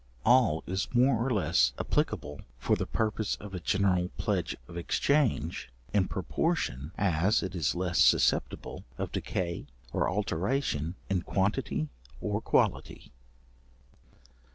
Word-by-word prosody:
All 120 -10 +4
is 95 +2 -2
more 120 -2 +4
or 135 - 0
less 75 - +3
applicable 75 0 -1 0.2
for - - +1
the - - -3
purpose 110 -1 -1
of 105 -2 -10
a 90 - -3
general 90 0 +1
pledge - - -1
of - - -11
exchange, 110 - 0 0.2
in 100 -3 +3
proportion 90 - -1
as 95 +2 +2
it 95 -1 -4
is 85 -4 0
less 90 -1 0
susceptible 75 -2 +2
of - - -3
decay 85 -2 -3 0.3
or - - +1
alteration 95 - -1
in 95 -2 0
quantity 95 -4 0 0.3
or 105 0 -2
quality. - - 0
95 Hz, 125 wpm, -29 LUFS, 85-110 Hz, 0.3 s, All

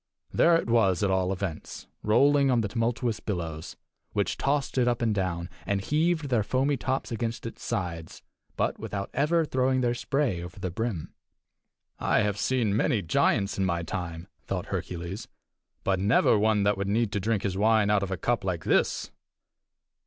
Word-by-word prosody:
There 170 0 +5
it 165 - 0
was 105 -7 +3
at 100 - +2
all 95 0 +1
events, 95 -4 -5 0.2
rolling 140 +6 +4
on 120 -3 +3
the 105 - -1
tumultuous 115 +1 -1
billows, 80 -7 -5 0.4
which - - 0
tossed 140 -1 0
it 120 - +3
up 120 -1 +1
and 115 -2 +1
down, 90 -3 -2 0.2
and 100 -1 0
heaved 155 - 0
their 120 -4 +2
foamy 130 +6 +1
tops 130 +2 -2
against 115 0 -3
its 115 - -7
sides, 85 -8 -4 0.3
but - - 0
without 100 -1 -4
ever 160 +3 +2
throwing 130 -2 +1
their 120 -1 +2
spray 120 -6 -1
over 90 +3 -9
the 90 -1 -3
brim. 110 -4 -3 0.9
"I - - +2
have 105 -1 -1
seen 120 -6 +1
many 110 -1 +1
giants 100 +5 +1
in 95 - +2
my 85 -2 0
time," 85 -1 -5 0.2
thought - - -2
Hercules, 90 +4 -4 0.6
"but 95 -1 +1
never 100 +4 +4
one 105 -1 +3
that 100 -1 +2
would 100 0 -1
need 110 0 +1
to 105 - -1
drink 105 +1 0
his 95 -2 -1
wine, 105 0 +3
out 105 -1 +3
of 100 - -2
a 95 - -2
cup 120 +5 0
like 90 -4 -2
this." - - +1
105 Hz, 180 wpm, -27 LUFS, 95-120 Hz, 0.9 s, There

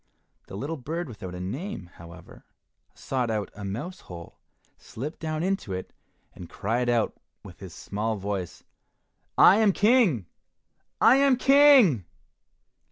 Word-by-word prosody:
The 95 - -8
little 150 +8 -4
bird 160 +6 -5
without 95 -7 -8
a - - -7
name, 100 - -6
however, 85 0 -14 0.5
sought 125 -3 -3
out 105 -2 -3
a 100 - -9
mouse 120 - -6
hole, 85 -2 -12 0.4
slipped 145 +8 -8
down 155 0 -3
into 190 - -2
it, 95 0 -7 0.4
and 85 -2 -11
cried 120 +4 -2
out 120 -2 +2
of - - -29
it - - -40 0.2
with - - -13
his - - -10
small 110 +2 -3
voice, 100 -3 -5 0.7
"I 190 - +7
am 215 -2 +4
King! 205 - +3 0.7
I 255 - +6
am 275 -1 +4
King!" 265 - +5
125 Hz, 145 wpm, -26 LUFS, -, 0.7 s, I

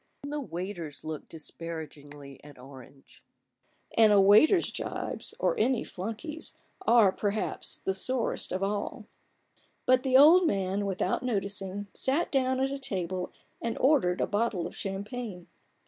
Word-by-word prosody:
Even 285 - -6
the 295 - -2
waiters 175 - -6
looked 155 -1 -6
disparagingly 150 -4 -8
at 145 -2 -13
Orange; 135 +1 -15 0.7
and 220 -2 +6
a 205 - +6
waiter's 215 - +5
jibes, - - -4
or - - +1
any 260 - +2
flunkey's, 230 - -6 0.3
are, 230 -5 +6
perhaps, 205 +2 -2
the 190 - -2
sorest 245 +5 0
of 185 +1 -2
all. 200 +1 -3 0.8
But 255 0 +4
the 260 -1 +4
old 330 +6 +7
man, 195 -1 -1
without 190 -1 -1
noticing, 200 -4 -3
sat 285 +6 0
down 260 -1 +1
at 270 +1 0
a 275 - -4
table 185 -7 -3 0.3
and 230 -1 -2
ordered 255 -11 +3
a - - +3
bottle 205 -4 -1
of - - -7
champagne. 200 -1 -5
200 Hz, 140 wpm, -29 LUFS, 180-255 Hz, 0.8 s, old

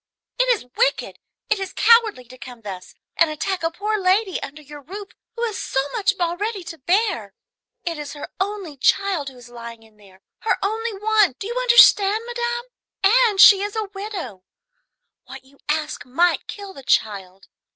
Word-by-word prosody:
"It - - +3
is 460 - +1
wicked, - - 0 0.3
it 430 - +2
is 385 -1 -5
cowardly, 460 - +4
to 255 +1 -15
come 245 -1 -10
thus 190 -4 -9 0.2
and 335 - +4
attack 315 +5 -3
a 330 - 0
poor 420 +5 -2
lady 380 +1 +1
under 300 +2 -8
your 295 +1 -11
roof 390 +7 -9 0.3
who 470 - -4
has 435 -5 -2
so 265 - -1
much 400 -1 +1
already 370 +4 -2
to 335 -1 -9
bear. 345 - 0 0.5
It 335 -3 -4
is 290 -1 -6
her 290 - -8
only 385 -6 -4
child 350 0 +1
who 260 - -16
is 245 -1 -14
lying 235 -1 -10
in 220 -1 -23
there, 195 -2 -20 0.2
her 445 - 0
only 445 +3 -2
one, 420 -4 +2
do - - -7
you 460 - -4
understand, 470 -4 +6
madame? 480 0 -3 0.4
and 435 0 +4
she 395 -1 +9
is 410 +1 -4
a 430 -2 -3
widow. 380 - -6 0.8
What 270 0 -11
you 275 +1 -23
ask 305 0 -2
might 340 +8 +1
kill 400 -2 -8
the 275 - -11
child. 195 -7 -1
375 Hz, 180 wpm, -22 LUFS, 270-425 Hz, 0.8 s, she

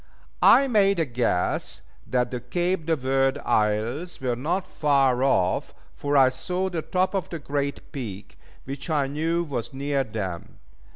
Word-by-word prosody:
I 275 - +7
made 200 -6 +3
a 165 - +2
guess 120 -8 -1 0.2
that 125 -1 0
the 125 - -3
Cape 175 +7 -1
de 165 - +3
Verd 135 -1 +1
Isles 110 +11 0
were 125 -2 -1
not 170 +9 -1
far 140 -7 +2
off, 95 -9 +1 0.2
for 145 0 0
I 130 -1 +7
saw 180 +8 -2
the 165 -2 -2
top 185 +4 0
of 190 -4 -2
the 170 - -4
Great 140 -1 -3
Peak, 105 -7 -7 0.2
which 140 +5 -7
I 150 -3 +2
knew 160 +5 -1
was 135 -5 -5
near 140 0 0
them. 95 -7 -6
140 Hz, 160 wpm, -25 LUFS, 125-165 Hz, 0.2 s, I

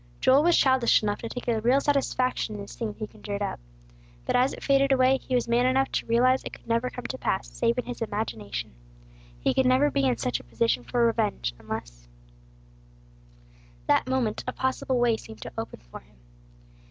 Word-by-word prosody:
Joel 260 +2 +5
was 340 +2 +4
childish 260 -4 +4
enough 205 -1 -1
to 230 - -6
take 245 +1 -7
a 225 -2 +1
real 250 +5 +4
satisfaction 260 -5 0
in 205 - -6
this 200 - -9
scene 220 -3 -5
he 215 - -5
conjured 205 -1 -6
up. 200 - -3 0.7
But - - 0
as 255 +2 +3
it - - -9
faded 275 0 +3
away, 260 0 +4
he 260 - -3
was 245 - +1
man 240 +2 +3
enough 265 +1 +2
to - - -2
realize 255 +3 +3
it - - -7
could - - -14
never 230 +2 +1
come 250 -1 -8
to 260 +2 -5
pass, 190 - -1
save 235 +1 0
in 250 - -2
his 245 -1 -7
imagination; 205 - -4 0.7
he - - +1
could 260 -1 +2
never 260 +3 +4
be 135 - +1
in 125 -2 +1
such 125 +1 -1
a - - -13
position 125 - 0
for 235 - +1
revenge, 60 - 0
unless, - - -7 1.8
That 255 - +2
moment 245 -5 0
a 250 - -2
possible 260 -1 -1
way 235 -2 +3
seemed 110 - -11
to - - -8
open - - -6
for - - -8
him. - - -26
235 Hz, 200 wpm, -26 LUFS, 205-260 Hz, 1.8 s, Joel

